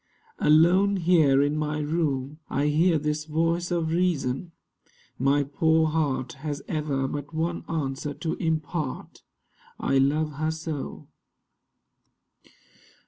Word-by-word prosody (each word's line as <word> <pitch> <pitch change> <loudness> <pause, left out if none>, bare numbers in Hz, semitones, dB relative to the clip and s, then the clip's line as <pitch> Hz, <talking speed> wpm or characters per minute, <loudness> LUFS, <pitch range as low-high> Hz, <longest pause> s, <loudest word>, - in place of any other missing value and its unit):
Alone 175 +6 +5
here 160 -6 +4
in 145 +1 0
my 150 0 -1
room, 150 -2 -1
I 145 +2 +1
hear 165 +3 +3
this 150 0 -2
voice 165 +2 0
of 170 -2 0
Reason. 170 -3 0 0.7
My 140 +2 +3
poor 160 +3 +2
heart 145 -5 -1
Has 145 -1 -4
ever 145 -4 -1
but 145 +2 -6
one 170 +2 -1
answer 145 -2 -3
to 160 +1 -3
impart, 160 -3 -3 0.6
'I 135 - +2
love 150 +3 +2
her 155 +1 0
so. 160 -2 -5
155 Hz, 115 wpm, -26 LUFS, 145-165 Hz, 0.7 s, Alone